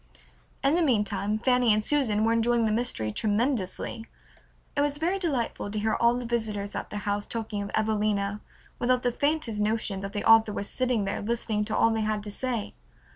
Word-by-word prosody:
In 275 - +3
the 345 - +3
meantime 210 - +1
Fanny 250 0 +3
and 210 0 +2
Susan 225 -6 +1
were 225 +1 +3
enjoying 230 0 +2
the 215 - +1
mystery 215 - -1
tremendously. 220 - -1 0.7
It 285 - +2
was 290 0 0
very 350 +6 0
delightful 265 - -2
to 215 - -4
hear 215 +1 +1
all 235 +1 +3
the 245 0 -4
visitors 215 -4 -2
at - - -5
their 210 - -5
house 205 +1 -2
talking 220 -3 -3
of 200 - -5
"Evelina" 210 -1 0 0.4
without 250 +1 +2
the 245 - +2
faintest 285 -5 0
notion 210 -2 0
that 195 +1 -6
the 205 - -3
author 225 -1 +6
was 200 - -4
sitting 250 -5 +1
there 195 - -2
listening 215 -1 -1
to 215 0 -2
all 230 - +4
they 225 0 0
had 215 -1 -1
to 205 - -5
say. 240 -1 -3
220 Hz, 195 wpm, -27 LUFS, 210-245 Hz, 0.7 s, author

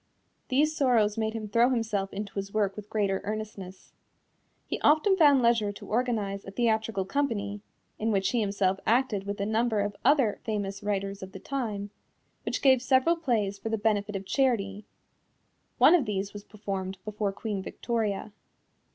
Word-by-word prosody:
These 300 +4 +2
sorrows 240 -8 +3
made 220 -1 -1
him 215 -1 -4
throw 235 +4 +4
himself 220 -6 -1
into 200 0 -5
his 195 0 -4
work 200 -2 0
with 210 -1 -9
greater 200 -3 0
earnestness. 205 -3 -6 0.7
He - - -4
even 315 +6 +5
found 290 -7 +5
leisure 230 -3 +3
to - - -11
organize 215 -4 -1
a - - -8
theatrical 220 -2 0
company 205 -5 -2 0.4
(in 225 +1 0
which 195 -1 +1
he 240 - +1
himself 195 -2 0
acted 230 -4 +2
with 200 0 -3
a 200 - 0
number 220 +1 +1
of 205 0 -2
other 270 -8 +3
famous 200 -2 -3
writers 200 -1 -2
of 190 0 -8
the - - -8
time), 215 -7 -4 0.5
which - - -2
gave 260 -3 +6
several 260 +6 +3
plays 220 -11 -1
for 225 - -4
the 225 - 0
benefit 205 -1 0
of 195 0 -4
charity. 210 -6 0 0.9
One - - +7
of 335 -7 +4
these 200 -2 -3
was 205 -1 -8
performed 195 -3 -5
before 210 -1 -2
Queen 200 0 -4
Victoria. 215 -1 -2
210 Hz, 170 wpm, -28 LUFS, 200-235 Hz, 0.9 s, One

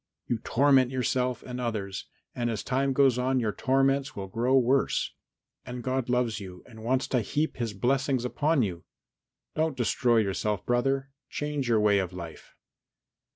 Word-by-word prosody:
You 120 - -1
torment 130 +2 +3
yourself 125 -1 -1
and 125 -1 -6
others, 105 -5 -3 0.3
and 120 -1 -1
as 110 -3 -3
time 135 +1 0
goes 135 -2 +3
on 130 +1 +1
your 110 -3 0
torments 135 +1 +1
will 100 - -4
grow 120 +7 +1
worse, 130 +2 +2 0.5
and 125 -1 -7
God 130 0 -1
loves 125 -3 +1
you 90 -3 -10
and 110 -2 -12
wants 130 +3 +1
to 125 - +2
heap 150 +8 -1
His 115 -4 -3
blessings 130 +3 +1
upon 145 +2 +1
you. 90 -5 -4 0.7
Don't 155 -3 0
destroy 120 0 +2
yourself, 105 -1 0
brother; 135 +3 0 0.2
change 150 -3 -3
your 115 -2 +4
way 105 -1 +4
of 95 -2 -3
life." 85 -3 -9
125 Hz, 160 wpm, -28 LUFS, 110-135 Hz, 0.7 s, your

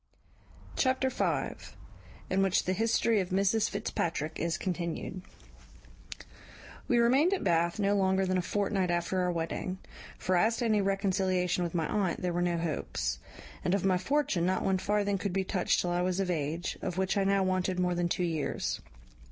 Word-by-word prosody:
Chapter 260 0 +1
v. - - -1 1.1
In 190 +1 +2
which 195 -2 +2
the 185 - 0
history 225 +1 +2
of 185 -2 -2
Mrs 200 +3 +2
Fitzpatrick 170 -6 -2
is 170 +1 0
continued. 180 0 -3 1.7
"We 245 - +3
remained 270 +11 +4
at - - -5
Bath 170 +2 +2
no 200 -1 +2
longer 190 -1 +2
than 185 0 +1
a - - +1
fortnight 195 0 0
after 175 +2 0
our 180 0 +1
wedding; 170 +2 -3 0.4
for 185 - 0
as 220 +6 +3
to 240 - -1
any 215 -2 +3
reconciliation 190 -2 +1
with 170 0 -3
my 160 -2 0
aunt, 190 -4 -1
there 180 -1 0
were 175 - 0
no 175 -1 +1
hopes; 140 - -2 0.4
and 180 - +2
of 195 - -1
my 185 -2 +3
fortune 275 - 0
not 185 +2 +1
one 190 -1 +1
farthing 205 0 0
could 200 -2 -2
be 195 0 +1
touched 185 -1 +1
till 175 - -1
I 175 0 +1
was 185 +1 0
of 190 -2 0
age, 160 +2 -2
of 180 - -3
which 190 +1 +1
I 200 - +2
now 195 0 +2
wanted 185 -1 0
more 180 0 +1
than 175 0 0
two 180 - 0
years. 160 -4 -2
185 Hz, 185 wpm, -30 LUFS, 175-200 Hz, 1.7 s, remained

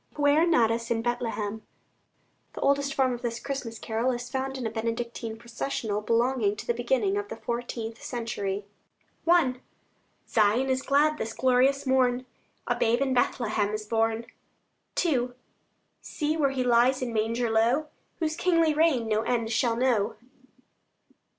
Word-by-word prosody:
PUER 295 +3 +4
NATUS 230 -6 +2
IN 225 -1 0
BETHLEHEM 225 -3 -2 0.9
The - - -7
oldest 280 0 +2
form 260 -2 +2
of 240 - -6
this 235 -1 -3
Christmas 255 -4 -5
carol 225 +3 -1
is 245 0 -5
found 265 0 -2
in 255 - -4
a 225 - -2
Benedictine 230 0 -3
Processional 230 -2 -3
belonging 230 -1 +1
to - - -8
the 235 - +1
beginning 235 -4 0
of 205 0 -3
the 225 - -6
fourteenth 235 -1 -5
century. 205 -5 -3 0.6
I 305 -8 +4 0.7
Zion 225 +5 +2
is 260 0 +1
glad 300 +3 +2
this 225 - -3
glorious 260 +2 +2
morn: 255 -1 +2 0.4
A - - +1
babe 235 +1 +2
in 270 -1 +1
Bethlehem 215 -4 +1
is 215 0 -5
born. 225 +1 0 0.8
II 250 -6 +1 0.7
See 305 0 -2
where 295 -4 +2
He 265 -1 -1
lies 250 +2 +3
in 240 -2 -3
manger 225 +2 0
low, 240 +7 +2 0.3
Whose 315 -2 -1
kingly 330 -3 +3
reign 295 -7 +2
no 215 0 +1
end 230 -1 -1
shall 235 0 +2
know. 230 -3 +1
240 Hz, 150 wpm, -27 LUFS, 225-265 Hz, 0.9 s, PUER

